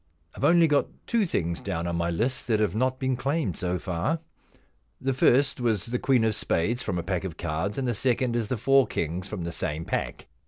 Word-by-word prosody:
I've - - -7
only 170 -1 +6
got 145 -2 +2 0.2
two 225 -4 +1
things 85 - -1
down 80 +1 -3
on 85 0 -2
my 85 0 0
list 115 +11 -1
that 110 -3 +2
have 105 -5 +1
not 130 +4 +1
been 130 -1 0
claimed 135 - -1
so 90 0 -1
far. 90 - -1 0.8
The 135 +1 0
first 135 +2 +3
v/as 110 -6 +1
the 120 +1 -2
queen 130 -4 +3
of 110 -1 +2
spades 110 +4 0
from 95 -7 -2
a 85 - -2
pack 95 0 -2
of 90 -4 -5
cards, 80 +7 -2
and 135 -2 -1
the 120 - +1
second 125 -1 +1
is 115 -3 0
the 125 - -1
four 135 +4 +4
kings 85 +4 -3
from 100 -5 -5
the 85 - -3
same 80 0 -3
pack. - - -3
110 Hz, 225 wpm, -27 LUFS, 90-130 Hz, 0.8 s, only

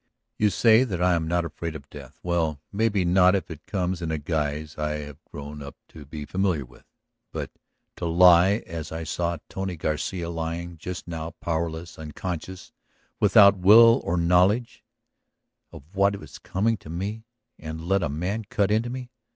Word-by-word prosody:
You 105 - +4
say 110 +5 +5
that 100 -9 -3
I 90 0 +3
am 80 -2 0
not 85 0 0
afraid 80 0 -5
of 70 -2 -9
death; 70 -4 -11
well, 80 -4 0
maybe 100 -2 +1
not 90 +2 +5
if 95 - -3
it 80 - -10
comes 90 -2 -2
in 85 - -3
a 80 - -1
guise 75 0 -3
I 75 0 -2
have 75 -1 -8
grown 75 +1 -8
up 70 0 -9
to 75 -3 -12
be 75 0 -7
familiar 90 -7 0
with. - - -20 0.5
But - - -5 0.5
to 85 - -3
lie 90 +4 +5
as 80 -1 -6
I 80 +1 -4
saw 85 +1 -2
Tony 95 -2 -4
Garcia 85 +3 -3
lying 85 0 -4
just 90 +2 -6
now, 80 -1 -6
powerless, 85 0 -3
unconscious, 85 +4 -6 0.5
without 100 -2 +6
will 115 +6 +7
or 85 - -1
knowledge 90 +7 +2 0.9
of - - -11
what 100 +1 +2
was - - -12
coming 110 +4 0
to 80 - -14
me, 105 +7 -5 0.3
and 80 +1 -6
to 80 - -9
let 95 +2 +2
a 75 - -1
man 90 +9 -3
cut 100 0 0
into 110 +3 +1
me 125 0 -6
85 Hz, 175 wpm, -25 LUFS, 80-95 Hz, 0.9 s, will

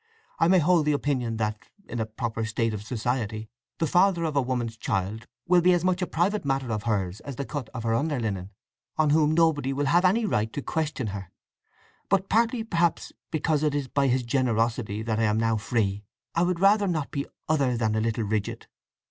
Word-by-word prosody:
I 165 - +4
may 185 +2 +5
hold 170 -1 +3
the 150 - +4
opinion 130 -6 -1
that, 105 -1 -3 0.2
in 120 - -5
a 110 - -1
proper 115 0 -3
state 110 +1 -1
of 105 - -4
society, 110 -1 -3 0.3
the 165 - +1
father 175 +1 +3
of 155 -3 -2
a 140 - +4
woman's 125 -3 -2
child 105 +2 -3 0.2
will 175 0 +5
be 180 +1 +5
as 175 -1 +1
much 185 0 +1
a 180 - 0
private 195 +5 0
matter 135 -3 -1
of 105 +1 -3
hers 95 -2 -1
as 140 - -7
the 140 - -4
cut 140 -6 -5
of 115 -3 -6
her 115 -1 +1
underlinen, 115 - -1 0.5
on 155 -2 +3
whom 155 0 +4
nobody 160 -5 +2
will 145 +1 -1
have 175 +6 +3
any 210 +5 +3
right 110 - 0
to 145 - -3
question 150 -7 -2
her. 95 -3 -7 0.8
But 195 -1 +1
partly, 230 +1 +2
perhaps, 170 -6 0 0.2
because 155 -1 0
it 150 -2 +1
is 145 -2 -1
by 140 +1 +1
his 130 0 +1
generosity 115 -3 0
that 110 -1 -1
I - - +2
am 105 +1 +2
now 115 -1 +2
free, 105 -1 -1 0.3
I 165 - +1
would 175 -1 +1
rather 200 +2 +4
not 155 -6 -2
be 140 -1 -3 0.2
other 140 -6 +2
than 110 -2 +1
a 110 - +1
little 115 0 0
rigid. 105 -1 -2
130 Hz, 210 wpm, -26 LUFS, 110-165 Hz, 0.8 s, may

